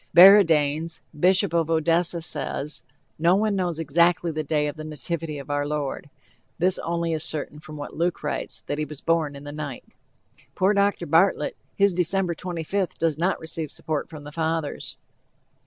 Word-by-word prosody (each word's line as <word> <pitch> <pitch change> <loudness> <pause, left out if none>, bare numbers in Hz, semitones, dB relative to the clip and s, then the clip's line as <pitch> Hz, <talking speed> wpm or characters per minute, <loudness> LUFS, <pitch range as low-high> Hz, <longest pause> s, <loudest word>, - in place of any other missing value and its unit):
Baradaens, 165 -4 +6
Bishop 180 +2 +3
of 165 -2 +1
Odessa, 165 +1 +2
says: 150 -1 -2 0.4
"No 170 +3 +4
one 210 0 +1
knows 175 -4 -1
exactly 170 +2 +2
the 155 0 -3
day 150 0 0
of 145 - -3
the 155 - -7
nativity 155 0 -4
of 140 +1 -7
our 145 0 0
Lord: 145 -1 -3 0.5
this 180 +2 +2
only 170 0 -1
is 155 -1 -1
certain 150 -1 -2
from 155 0 -10
what 145 - -7
Luke 170 +1 -1
writes, 150 - -3
that 145 - -4
he 155 - 0
was 150 -1 -9
born 160 -3 0
in 140 - -10
the 145 - -7
night." 145 -3 -6 0.7
Poor 190 +2 +3
Dr. 200 -3 +1
Bartlett, 170 +6 +2 0.2
his 200 -1 +4
December 180 +1 +1
25th 180 +2 -3
does 160 -2 0
not 185 +3 +1
receive 160 -1 -5
support 155 -2 -3
from 150 -2 -10
the 150 - -9
Fathers. 160 -1 -3
160 Hz, 170 wpm, -24 LUFS, 150-175 Hz, 0.7 s, Baradaens